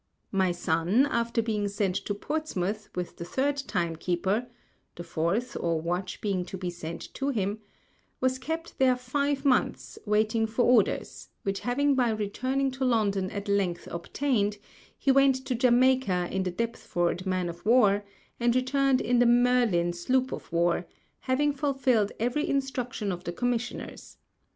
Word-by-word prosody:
My 190 Hz, -2 st, +2 dB
Son, 175 Hz, +8 st, +2 dB
after 235 Hz, -4 st, 0 dB
being 210 Hz, -2 st, -1 dB
sent 200 Hz, -2 st, -1 dB
to 205 Hz, -, -1 dB
Portsmouth 210 Hz, -, -3 dB
with 180 Hz, -1 st, -4 dB
the -, -, -5 dB
third 270 Hz, +11 st, 0 dB
Time 175 Hz, -12 st, -2 dB
keeper 190 Hz, +8 st, -1 dB, 0.5 s
(the 175 Hz, -, -7 dB
fourth 170 Hz, +9 st, -1 dB
or 165 Hz, -1 st, 0 dB
Watch 180 Hz, +3 st, -3 dB
being 195 Hz, -4 st, 0 dB
to 190 Hz, -, -7 dB
be 180 Hz, -1 st, -3 dB
sent 170 Hz, -1 st, -7 dB
to 275 Hz, 0 st, -2 dB
him) 205 Hz, -4 st, -1 dB, 0.6 s
was 260 Hz, 0 st, +1 dB
kept 320 Hz, +5 st, -5 dB
there 260 Hz, -1 st, +5 dB
five 280 Hz, +3 st, -1 dB
Months, 260 Hz, -2 st, +1 dB
waiting 215 Hz, +2 st, +2 dB
for 225 Hz, +3 st, 0 dB
Orders; 240 Hz, -5 st, +2 dB
which 195 Hz, 0 st, -1 dB
having 280 Hz, +4 st, +1 dB
by 250 Hz, -3 st, +2 dB
returning 255 Hz, +6 st, -1 dB
to 265 Hz, +1 st, -4 dB
London 205 Hz, -6 st, +1 dB
at 200 Hz, +1 st, -5 dB
Length 195 Hz, -4 st, 0 dB
obtained, 210 Hz, +3 st, -1 dB, 0.4 s
he 275 Hz, -, +2 dB
went 275 Hz, 0 st, +5 dB
to 260 Hz, -, -1 dB
Jamaica 245 Hz, -6 st, +3 dB
in 190 Hz, -, 0 dB
the 185 Hz, -, -1 dB
Deptford 185 Hz, -3 st, -2 dB
Man 185 Hz, -1 st, 0 dB
of 170 Hz, 0 st, -7 dB
War, 210 Hz, -3 st, +4 dB, 0.4 s
and 240 Hz, 0 st, +2 dB
returned 260 Hz, +1 st, +2 dB
in 245 Hz, 0 st, +2 dB
the 245 Hz, -, +5 dB
Merlin 240 Hz, -8 st, +3 dB
Sloop 255 Hz, +9 st, 0 dB
of -, -, -7 dB
War, 170 Hz, +1 st, +1 dB, 0.3 s
having 285 Hz, +3 st, +1 dB
fulfilled 265 Hz, -7 st, +1 dB
every 245 Hz, +7 st, 0 dB
Instruction 250 Hz, -6 st, -2 dB
of 175 Hz, 0 st, -5 dB
the 175 Hz, -, -3 dB
Commissioners. 245 Hz, +4 st, -3 dB
225 Hz, 155 wpm, -28 LUFS, 185-255 Hz, 0.6 s, there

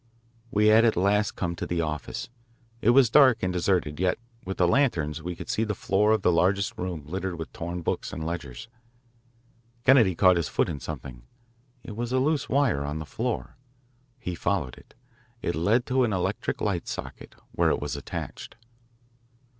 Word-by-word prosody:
We 105 Hz, -1 st, +2 dB
had 110 Hz, +1 st, +6 dB
at 115 Hz, -2 st, +3 dB
last 100 Hz, +3 st, +2 dB
come 85 Hz, -2 st, -2 dB
to -, -, -4 dB
the 85 Hz, -1 st, 0 dB
office. 75 Hz, -, -4 dB, 0.5 s
It 110 Hz, -, +3 dB
was 120 Hz, -2 st, +5 dB
dark 130 Hz, -7 st, +6 dB
and 90 Hz, 0 st, 0 dB
deserted, 85 Hz, -4 st, 0 dB
yet 90 Hz, 0 st, +1 dB, 0.3 s
with 95 Hz, +1 st, -5 dB
the 90 Hz, -, +3 dB
lanterns 85 Hz, -, +1 dB
we 85 Hz, +2 st, -5 dB
could -, -, -9 dB
see 110 Hz, -, 0 dB
the 105 Hz, -2 st, -2 dB
floor 105 Hz, +4 st, +2 dB
of 110 Hz, -3 st, +2 dB
the -, -, +4 dB
largest 100 Hz, +6 st, +1 dB
room 90 Hz, -6 st, -4 dB
littered 95 Hz, +2 st, -4 dB
with 80 Hz, -1 st, -7 dB
torn 85 Hz, +1 st, -5 dB
books -, -, -2 dB
and 80 Hz, -, -5 dB
ledgers. 80 Hz, -, -5 dB, 1.2 s
Kennedy 120 Hz, -9 st, +6 dB
caught 90 Hz, 0 st, +5 dB
his 85 Hz, -3 st, 0 dB
foot -, -, 0 dB
in 75 Hz, -, -4 dB
something. 60 Hz, -1 st, -7 dB, 0.6 s
It 105 Hz, -, -8 dB
was 120 Hz, +2 st, -3 dB
a 130 Hz, -, +2 dB
loose 145 Hz, +2 st, +1 dB
wire 135 Hz, -, +2 dB
on 75 Hz, +1 st, -3 dB
the 80 Hz, -, -5 dB
floor. 115 Hz, +9 st, -4 dB, 0.6 s
He 90 Hz, -8 st, -5 dB
followed 85 Hz, -6 st, -1 dB
it. -, -, -19 dB, 0.5 s
It 85 Hz, -, 0 dB
led 105 Hz, +10 st, +2 dB
to 130 Hz, 0 st, +2 dB
an 110 Hz, -4 st, +1 dB
electric 90 Hz, -1 st, -2 dB
light -, -, -1 dB
socket, -, -, -7 dB, 0.2 s
where -, -, +2 dB
it -, -, +1 dB
was 75 Hz, 0 st, -4 dB
attached. 70 Hz, -, -7 dB
95 Hz, 185 wpm, -26 LUFS, 80-110 Hz, 1.2 s, had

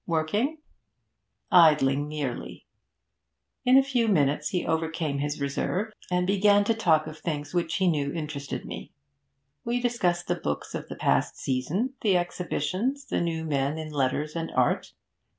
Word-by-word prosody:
'Working?' 195 Hz, -, 0 dB, 0.9 s
'Idling 150 Hz, -5 st, +5 dB
merely.' 150 Hz, -5 st, -5 dB, 1.0 s
In 255 Hz, +1 st, +7 dB
a 270 Hz, -, +6 dB
few 250 Hz, -4 st, +1 dB
minutes 150 Hz, -6 st, +2 dB
he 180 Hz, -, -1 dB
overcame 160 Hz, -3 st, -1 dB
his 145 Hz, +1 st, -2 dB
reserve 180 Hz, +9 st, -2 dB, 0.2 s
and 180 Hz, 0 st, +1 dB
began 200 Hz, +1 st, +4 dB
to 230 Hz, -, +2 dB
talk 165 Hz, -9 st, +3 dB
of 155 Hz, -, -8 dB
the -, -, -20 dB
things 145 Hz, -2 st, -4 dB
which 170 Hz, -2 st, 0 dB
he 190 Hz, -1 st, +2 dB
knew 145 Hz, -4 st, +1 dB
interested 150 Hz, -3 st, -5 dB
me. -, -, -7 dB, 0.7 s
We 240 Hz, +1 st, 0 dB
discussed 185 Hz, -8 st, 0 dB
the 175 Hz, -, +2 dB
books 75 Hz, -, -4 dB
of -, -, -5 dB
the -, -, -6 dB
past -, -, +1 dB
season, 155 Hz, -, -1 dB
the 195 Hz, -4 st, +3 dB
exhibitions, 185 Hz, -, -2 dB
the -, -, -1 dB
new 165 Hz, -1 st, -2 dB
men 140 Hz, 0 st, 0 dB
in 155 Hz, -1 st, -6 dB
letters 145 Hz, +2 st, -1 dB
and 165 Hz, -1 st, -3 dB
art. -, -, +1 dB
165 Hz, 155 wpm, -27 LUFS, 150-200 Hz, 1.0 s, In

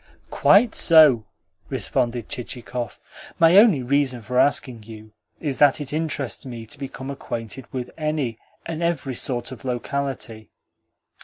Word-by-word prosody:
"Quite 215 Hz, +3 st, +4 dB
so," 150 Hz, -, +5 dB, 0.4 s
responded 120 Hz, -3 st, -1 dB
Chichikov. 125 Hz, -3 st, -6 dB, 0.4 s
"My 165 Hz, +1 st, +5 dB
only 200 Hz, -, +6 dB
reason 130 Hz, -2 st, 0 dB
for 125 Hz, +4 st, 0 dB
asking 130 Hz, -4 st, +1 dB
you 110 Hz, 0 st, -12 dB, 0.3 s
is 145 Hz, -4 st, -3 dB
that 145 Hz, 0 st, +5 dB
it 145 Hz, -1 st, -6 dB
interests 155 Hz, -4 st, -2 dB
me 120 Hz, -3 st, -8 dB
to 135 Hz, +6 st, -9 dB
become 135 Hz, 0 st, -6 dB
acquainted 120 Hz, -2 st, -6 dB
with 125 Hz, -2 st, -5 dB
any 150 Hz, -7 st, -2 dB, 0.3 s
and 165 Hz, 0 st, -5 dB
every 170 Hz, -6 st, -1 dB
sort 125 Hz, 0 st, -2 dB
of 130 Hz, -, -10 dB
locality." 125 Hz, -3 st, -4 dB
130 Hz, 135 wpm, -23 LUFS, 120-145 Hz, 0.4 s, only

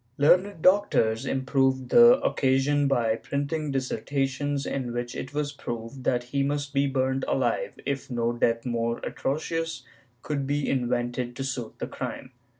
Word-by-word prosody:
Learned 180 Hz, +4 st, +3 dB
doctors 135 Hz, -, +3 dB
improved 130 Hz, -1 st, +1 dB
the 240 Hz, +2 st, +8 dB
occasion 140 Hz, +2 st, +2 dB
by 115 Hz, -5 st, +2 dB
printing 145 Hz, +4 st, -3 dB
dissertations 135 Hz, +2 st, -1 dB
in 125 Hz, -3 st, -3 dB
which 120 Hz, 0 st, -3 dB
it 130 Hz, -, -5 dB
was 145 Hz, 0 st, -2 dB
proved 120 Hz, -1 st, -7 dB
that 120 Hz, -1 st, +1 dB
he 140 Hz, +3 st, -2 dB
must 145 Hz, 0 st, -1 dB
be 140 Hz, 0 st, +2 dB
burnt 130 Hz, 0 st, 0 dB
alive, -, -, 0 dB
if 140 Hz, -1 st, -3 dB
no 120 Hz, -1 st, 0 dB
death 115 Hz, 0 st, +1 dB
more 115 Hz, -1 st, -1 dB
atrocious 165 Hz, +3 st, -2 dB, 0.4 s
could 140 Hz, -3 st, -2 dB
be 145 Hz, 0 st, 0 dB
invented 120 Hz, -1 st, -1 dB
to 135 Hz, -, -4 dB
suit 125 Hz, -4 st, -4 dB
the -, -, -3 dB
crime. 130 Hz, -, -6 dB
135 Hz, 150 wpm, -26 LUFS, 120-145 Hz, 0.4 s, the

